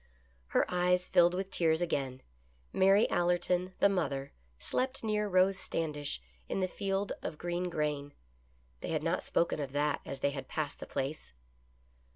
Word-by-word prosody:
Her - - +3
eyes 180 0 +2
filled 175 -1 +5
with 190 +1 -3
tears 160 -3 +3
again. 135 -7 -2 0.5
Mary 195 +3 +5
Allerton, 175 +1 +1
the - - +6
mother, 140 -8 -1 0.3
slept 260 - -1
near 210 -1 +1
Rose 190 0 +3
Standish 150 - -2 0.3
in - - -1
the 185 - +1
field 195 +1 -1
of 150 - -4
green 175 +2 -2
grain. 150 -3 -2 0.6
They - - -5
had - - 0
not - - +1
spoken 170 -2 +1
of 140 -2 -4
that 145 0 +1
as 135 -1 -6
they 140 - +2
had 135 -2 -6
passed 150 -2 -3
the - - -7
place. 135 - -4
175 Hz, 160 wpm, -32 LUFS, 145-190 Hz, 0.6 s, the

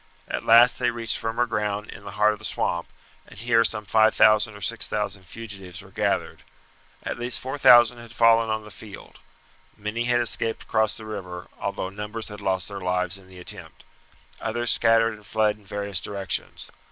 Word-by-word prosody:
At - - -3
last 120 +2 +6
they 125 -1 +2
reached 115 -2 -3
firmer 115 +2 0
ground 105 -2 -2
in 100 - -11
the 100 - -8
heart 105 0 +4
of 105 - -10
the - - -16
swamp, 85 -4 -1 0.4
and - - -15
here 115 +1 +3
some 110 -2 -1
5000 110 +1 +4
or - - -10
6000 95 0 -2
fugitives 100 -5 -8
were - - -16
gathered. - - -1 0.6
At - - -4
least 120 0 +1
4000 125 -3 +5
had 115 -1 -12
fallen 115 -1 +4
on 110 0 -2
the 105 - -12
field. 105 -1 -12 0.6
Many 105 +3 -3
had 120 0 +2
escaped 115 -1 -1
across 110 -1 0
the 110 - -10
river, 95 -5 -7
although 95 - -3
numbers 105 +3 -6
had 105 0 -9
lost 95 -2 -1
their 100 -1 -7
lives 90 +1 -1
in 95 - -19
the 95 0 -15
attempt. 90 -2 -8 0.6
Others 120 +1 0
scattered 115 0 +3
and 105 -2 -14
fled 105 -1 +1
in 105 - -22
various 100 -2 -2
directions. 100 -1 -3
105 Hz, 180 wpm, -25 LUFS, 100-115 Hz, 0.6 s, last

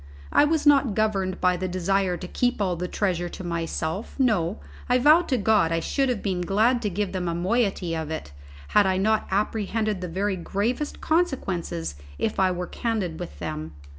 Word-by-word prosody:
I - - +5
was 310 0 +1
not 275 -7 +5
governed 195 -4 0
by 180 -1 +2
the 185 +1 -2
desire 185 0 0
to 180 - -7
keep 245 +5 0
all 185 -3 +1
the 180 +2 -3
treasure 180 -3 -1
to 185 - -8
myself; 170 +2 -3
no, 215 -11 +1 0.3
I 250 - +5
vow 300 +6 +6
to 275 -7 -1
God 205 -6 +3
I 165 - +1
should 270 - 0
have 240 -5 -2
been 185 -3 -1
glad 220 +7 +2
to 210 - 0
give 200 +1 -2
them 180 -2 -2
a 170 - -1
moiety 190 -2 0
of 160 -1 -4
it, 160 - -5 0.4
had 205 -2 +4
I 190 -1 +1
not 215 +3 +1
apprehended 210 0 -1
the 180 - -3
very 190 +3 -1
gravest 225 - -2
consequences 190 - -1 0.2
if 215 - -1
I 190 -1 +4
were 180 0 -2
candid 200 -7 -2
with 70 - -7
them. 75 +2 -5
195 Hz, 195 wpm, -25 LUFS, 175-225 Hz, 0.4 s, vow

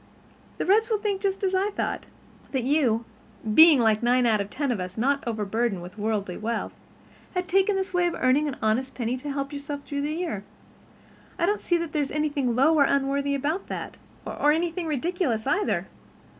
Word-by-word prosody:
"The - - -2
Reds 435 +5 +3
will 440 - +2
think 405 -2 -2
just 390 0 -1
as 380 -1 +1
I 385 +2 +2
thought—that 265 - -5
you, 250 -5 +2 0.5
being 315 +1 +8
like 220 -2 +3
nine 245 +1 +3
out 220 -3 +3
of 200 - -5
ten 280 +2 -2
of 230 - -1
us, 180 +2 -6
not 275 +5 +1
overburdened 220 -3 -1
with 180 +4 -11
worldly 205 -4 -2
wealth, 230 +2 -3 0.6
had 360 0 -1
taken 390 +2 +3
this 380 0 -2
way 355 -1 +3
of 345 - -2
earning 265 +4 +2
an 280 - -3
honest 235 +5 0
penny 240 0 -1
to 285 +3 -5
help 275 +1 -3
yourself 285 0 -5
through 285 -1 -3
the 295 +2 -2
year. 320 - -3 0.9
I 340 - +2
don't 415 +3 0
see 345 - +1
that 335 -2 -4
there's 295 -3 -1
anything 290 -5 0
low 280 +6 +4
or 300 -3 +5
unworthy 280 +1 +1
about 305 +7 -2
that, - - -6 0.3
or 295 - +1
anything 335 +2 -1
ridiculous 300 - -1
either. 400 +9 0
280 Hz, 190 wpm, -26 LUFS, 235-345 Hz, 0.9 s, being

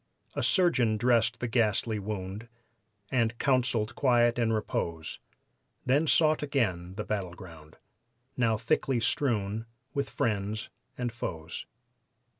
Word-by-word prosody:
A - - -1
surgeon 130 - +3
dressed 120 0 +2
the 120 - 0
ghastly 110 -2 +1
wound 100 +1 -5 0.6
And 115 -3 +1
counseled 120 -5 +1
quiet 120 -2 +3
and 115 -1 +2
repose, 85 -7 -2 0.7
Then 145 +5 +3
sought 155 0 +4
again 95 -11 -1
the 105 - -3
battleground, 90 -6 -6 0.6
Now 115 -3 +2
thickly 120 +3 +1
strewn 115 -3 0 0.3
with 140 -2 -1
friends 105 -1 -1 0.3
and 125 -1 -2
foes. 85 -8 -6
115 Hz, 110 wpm, -29 LUFS, 100-125 Hz, 0.7 s, sought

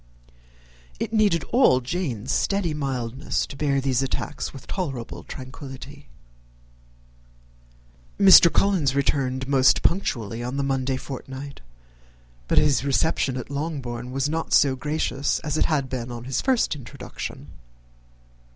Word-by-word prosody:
It - - -3
needed 205 -7 +3
all 235 - +5
Jane's 130 - -3
steady 195 -5 0
mildness 135 -2 -2
to - - -10
bear 140 -1 +1
these 135 -2 +1
attacks 135 - -3
with 135 - -11
tolerable 135 - -5
tranquillity. 130 +1 -9 2.1
Mr. 190 -3 +9
Collins 160 -6 +2
returned 130 -2 0
most 135 -2 +4
punctually 115 - 0
on 125 +3 -4
the 140 - 0
Monday 135 -1 0
fortnight, 135 +1 -8 0.9
but - - 0
his 145 -3 +4
reception 140 -1 +1
at 125 +2 -6
Longbourn 135 -5 -4
was 135 +1 0
not 160 +2 -1
quite - - -5
so 135 -3 +5
gracious 145 0 -1
as 150 0 -3
it - - +2
had 145 -5 0
been 125 -2 -4
on 120 -1 -7
his 130 +2 -2
first 255 - +1
introduction. 120 -7 -8
135 Hz, 130 wpm, -24 LUFS, 130-155 Hz, 2.1 s, Mr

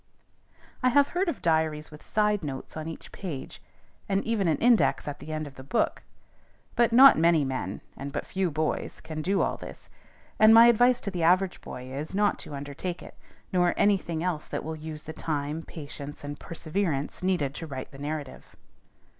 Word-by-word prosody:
I 255 - +4
have 280 +3 +4
heard 360 +1 0
of 310 - -5
diaries 160 -2 +1
with 150 - -12
side 210 -3 +1
notes 140 -3 -6
on 155 0 -5
each 165 - -8
page, 160 -9 -7 0.5
and 195 0 +1
even 220 -5 +1
an 160 - +2
index 215 - +3
at 145 - -5
the 155 - -8
end 155 0 -3
of 140 -2 -11
the 130 - -9
book; 220 - 0 0.7
but 235 -1 +3
not 260 -4 +8
many 165 -3 +4
men, 130 -8 -3
and 140 +1 -6
but - - -4
few 190 -1 -1
boys, 155 0 -2
can 160 -1 -6
do 195 +5 +1
all - - -1
this; - - -11 0.5
and 220 +1 +8
my 230 +1 +10
advice 245 +1 +5
to 200 - -3
the 180 -2 -3
average 180 +3 +3
boy 125 0 -8
is, 150 +6 -5
not 205 0 +2
to 145 - -8
undertake 145 +6 -5
it, - - -11 0.4
nor 175 -1 +3
any 200 -1 +4
thing 165 -2 -4
else 175 -4 -2
that - - -4
will 160 +1 -4
use 155 0 -7
the 160 - -7
time, 150 0 -3
patience, 145 -3 -9
and 145 0 -6
perseverance, 160 -3 -3
needed 180 -7 0
to 165 +2 -6
write 130 -3 -6
the 135 - -12
narrative. 145 -1 -6
160 Hz, 195 wpm, -27 LUFS, 145-195 Hz, 0.7 s, my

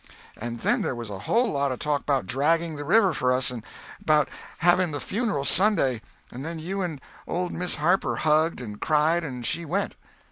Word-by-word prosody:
"And 120 +1 -6
then - - +2
there - - -1
was 115 -3 -6
a 95 - -6
whole 235 -1 +3
lot 140 -1 0
of 130 - -3
talk 150 -3 -2
'bout 135 -6 +1
dragging 160 - +1
the 145 - -5
river 195 +3 +4
for 125 -2 +1
us, 125 +1 +2
and 120 -2 -6 0.4
'bout 150 -3 +3 0.3
having 175 +1 +4
the 145 -2 -4
funeral 205 - -1
Sunday, 150 - +3 0.3
and 125 +3 -7
then 165 +2 -5
you 190 +5 -3
and 165 -6 -3 0.3
old 180 +1 -2
Miss 180 +1 -1
Harper 175 +6 +1
hugged 155 -1 +2
and 105 -4 -8
cried, 160 +3 +2
and 125 -5 -5
she 170 - -1
went." 160 - -2
150 Hz, 200 wpm, -26 LUFS, 130-175 Hz, 0.4 s, river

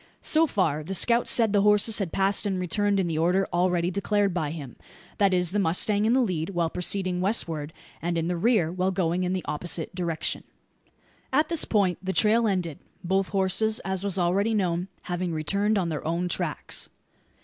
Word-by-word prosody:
So 320 +1 +3
far 160 - 0
the 190 +5 -4
scout 235 +5 +3
said 225 -3 +4
the 205 - +4
horses 210 +2 +3
had 190 -5 -2
passed 195 +2 +1
and 190 -2 -1
returned 200 +3 +1
in 190 - +1
the 160 -2 -2
order 180 +4 +2
already 175 0 +1
declared 200 0 0
by 160 -4 -1
him: 145 -5 -8 0.4
that 200 -2 +4
is, 180 -2 +2
the 205 - 0
mustang 200 +4 +2
in 225 - +3
the 260 - +3
lead 170 -6 -2
while 170 -4 -1
proceeding 180 0 -1
westward, 165 -7 -1 0.3
and 170 0 -1
in 165 0 -1
the 180 - -1
rear 185 -3 +2
while 185 +1 0
going 180 -1 0
in 180 - -1
the 185 - -3
opposite 165 +1 -3
direction. 170 -3 -2 0.9
At 305 0 +2
this 335 -3 +1
point 195 -5 +1
the 190 0 -3
trail 225 +3 +3
ended 180 -7 -2 0.2
both 190 +2 0
horses, 200 +3 +1
as 190 0 -3
was 195 -2 -2
already 195 +5 +1
known, 180 -3 0 0.2
having 175 -1 -3
returned 200 +7 0
on 180 -3 0
their 155 -2 -4
own 170 +3 -1
tracks. 175 - -3
185 Hz, 195 wpm, -26 LUFS, 170-205 Hz, 0.9 s, said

